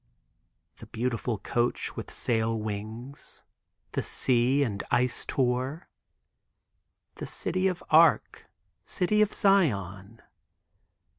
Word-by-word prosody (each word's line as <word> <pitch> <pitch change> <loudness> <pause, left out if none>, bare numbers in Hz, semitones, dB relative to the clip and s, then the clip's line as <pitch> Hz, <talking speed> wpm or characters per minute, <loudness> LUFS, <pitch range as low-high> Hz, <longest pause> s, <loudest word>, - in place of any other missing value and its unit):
The - - -12
beautiful 120 -1 -2
coach, 120 +4 -1
with - - -6
sail 115 -1 0
wings, 110 +5 -6 0.5
the - - -1
sea 130 +3 +2
and 105 -6 -2
ice 125 0 +2
tour. 130 +5 -1 1.3
The - - -6
city 185 +1 -1
of 180 -2 -3
Arc, 160 +1 +4 0.4
city 210 - +1
of 215 0 +3
Zion! 110 - +1
125 Hz, 95 wpm, -28 LUFS, 110-155 Hz, 1.3 s, Arc